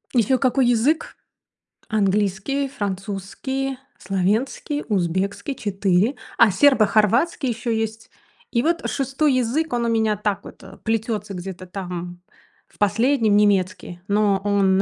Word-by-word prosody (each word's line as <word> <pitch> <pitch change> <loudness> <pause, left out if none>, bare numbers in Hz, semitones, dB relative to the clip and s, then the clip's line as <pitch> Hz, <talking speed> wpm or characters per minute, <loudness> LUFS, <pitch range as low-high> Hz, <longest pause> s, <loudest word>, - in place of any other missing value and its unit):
Еще 245 +3 +3
какой 255 0 +2
язык? 245 +7 +1 0.7
Английский, 210 +6 0
французский, 210 +4 -4 0.2
словенский, 215 +10 -1
узбекский, 195 - -1
4. 200 +3 +1 0.2
А 230 -4 +6
сербо-хорватский 240 - +3
еще 230 0 -2
есть 225 0 -4 0.4
и 235 - +2
вот 335 +3 0
6 275 +1 0
язык, 255 +5 0
он 240 -1 0
у - - +1
меня 220 -2 +2
так 205 -1 -2
вот, - - -12
э, - - -12
плетется 220 -2 -2
где-то 185 0 -7
там 180 -1 -6 0.5
в - - -26
последнем. 225 +2 +2
Немецкий, 185 -3 +1
но 205 -1 +2
он, 195 -2 +3
215 Hz, 120 wpm, -22 LUFS, 195-255 Hz, 0.7 s, А